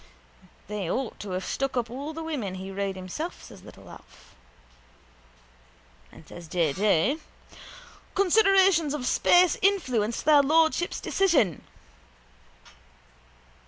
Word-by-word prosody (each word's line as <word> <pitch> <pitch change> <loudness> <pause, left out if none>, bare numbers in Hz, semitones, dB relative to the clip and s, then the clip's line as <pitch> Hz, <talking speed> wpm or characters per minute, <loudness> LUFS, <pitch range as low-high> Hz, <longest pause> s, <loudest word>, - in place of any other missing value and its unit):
—They 205 -4 -4
ought 260 +2 -3
to 205 - -7
have 185 +1 -4
stuck 270 -1 -3
up 240 -1 -1
all 280 +5 -6
the 325 +1 -7
women 255 -13 -4
he 190 +1 -7
rode 195 0 -3
himself, 190 - -7
says - - -13
little - - -15
Alf. - - -16 1.8
And 160 - -16
says 175 -1 -11
J. 160 -3 0
J.: 205 - +1 1.0
—Considerations 385 -5 +3
of 265 -4 -5
space 355 +6 +3
influenced 255 - 0
their 295 -1 +6
lordships' 320 +4 +1
decision. 300 - +1
265 Hz, 115 wpm, -26 LUFS, -, 1.8 s, their